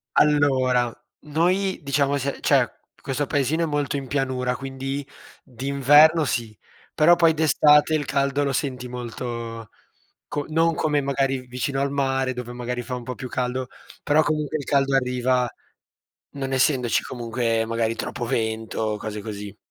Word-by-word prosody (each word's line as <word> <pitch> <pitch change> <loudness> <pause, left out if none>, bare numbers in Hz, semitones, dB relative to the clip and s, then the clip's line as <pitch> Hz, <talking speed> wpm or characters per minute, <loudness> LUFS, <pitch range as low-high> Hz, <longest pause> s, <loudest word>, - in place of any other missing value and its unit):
Allora, 130 -5 +3 0.3
noi 180 +6 +1
diciamo 140 0 +1
se 140 0 -3
c'è - - +4 0.3
questo 135 +2 -2
paesino 145 +4 +1
è - - +2
molto 145 -2 -1
in 135 -1 -4
pianura, 130 -2 -1
quindi 135 +1 -5 0.4
d'inverno 140 +5 +4
sì, 115 -5 -3 0.4
però 170 +3 +6
poi 165 -2 +4
d'estate 150 0 +4
il 150 -2 +1
caldo 140 +1 0
lo 140 - 0
senti 125 -2 -3
molto 115 -2 -6 0.6
co 145 -1 -3
non 165 +1 +2
come 150 -2 +1
magari 135 -1 -1
vicino 125 +2 -2
al 140 0 0
mare 135 -2 0
dove 125 -1 -6
magari 125 0 -4
fa 125 +1 -5
un 125 - -6
po' 125 +1 -5
più 130 - -6
caldo, 125 +1 -2 0.3
però 150 +2 +3
comunque 155 -1 -1
il 145 - -6
caldo 135 -1 +2
arriva, 125 -1 +1 0.9
non 135 -1 -3
essendoci 130 -2 +2
comunque 115 -2 -1
magari 115 0 -1
troppo 120 - -4
vento 110 -1 -2
o 110 -1 -1
cose 105 0 -5
così. 105 -1 -7
135 Hz, 150 wpm, -23 LUFS, 125-145 Hz, 0.9 s, però